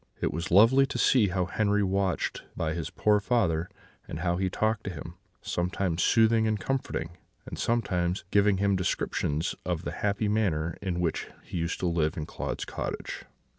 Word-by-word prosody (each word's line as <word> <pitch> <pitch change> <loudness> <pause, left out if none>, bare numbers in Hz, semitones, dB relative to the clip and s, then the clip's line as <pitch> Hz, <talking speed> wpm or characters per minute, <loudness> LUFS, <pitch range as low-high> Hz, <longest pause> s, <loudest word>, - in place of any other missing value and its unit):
It - - -1
was 85 +4 -3
lovely 115 +9 +6
to - - -4
see 120 -6 +4
how 90 -1 0
Henri 105 +2 +1
watched 95 -1 0 0.2
by 80 -1 -1
his 80 -2 -3
poor 105 -1 +2
father, 95 -7 +1 0.4
and 80 - -5
how 85 0 +1
he 95 0 0
talked 110 +3 0
to - - -2
him, 85 -6 -7 0.3
sometimes 90 -1 -1
soothing 110 -1 +4
and 110 -1 0
comforting, 135 +6 -3 0.3
and - - -7
sometimes 90 -6 0
giving 100 -1 +4
him 100 0 +2
descriptions 80 -3 -1
of 90 -2 -2
the - - -3
happy 105 +1 -1
manner 85 -7 0
in 90 -3 -2
which 85 -3 -1 0.2
he - - -6
used 85 +1 -2
to 90 - +1
live 85 0 0
in 75 - -3
Claude's - - -4
cottage. - - -5
95 Hz, 175 wpm, -28 LUFS, 85-105 Hz, 0.4 s, lovely